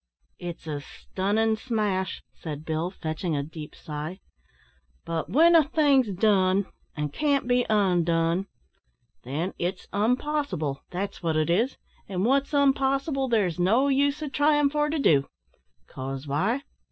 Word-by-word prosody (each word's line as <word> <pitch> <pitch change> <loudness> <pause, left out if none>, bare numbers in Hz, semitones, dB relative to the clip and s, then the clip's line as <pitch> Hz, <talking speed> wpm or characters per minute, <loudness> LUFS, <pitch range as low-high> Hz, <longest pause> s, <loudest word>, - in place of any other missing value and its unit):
"It's 175 -2 -7
a 150 -2 -4
stunnin' 215 +8 -1
smash," 210 -6 -2
said 155 -1 -7
Bill, 160 +2 -1
fetching 160 -2 -3
a 140 - -1
deep 155 0 -9
sigh. 155 +5 -6 0.9
"But 165 -1 -2
w'en 335 +5 +5
a 325 - +7
thing's 280 -5 +3
done, 195 -1 +2 0.3
an' 150 0 -1
can't 280 - 0
be 245 0 +2
undone, 175 -3 +2 0.7
then 155 +9 -3
it's 180 +2 -2
unpossible, 215 - 0
that's 195 +3 -4
wot 165 -2 0
it 155 +2 +1
is; 230 +10 +1 0.3
and 190 0 -1
wot's 275 +3 +2
unpossible 275 0 +2
there's 195 -7 +1
no 225 +10 +3
use 285 +2 +1
o' - - -2
tryin' 290 0 +3
for 295 0 +1
to 315 - -1
do. 145 - +3 0.6
'Cause 135 +1 -6
why? 195 - 0
195 Hz, 140 wpm, -26 LUFS, 165-270 Hz, 0.9 s, a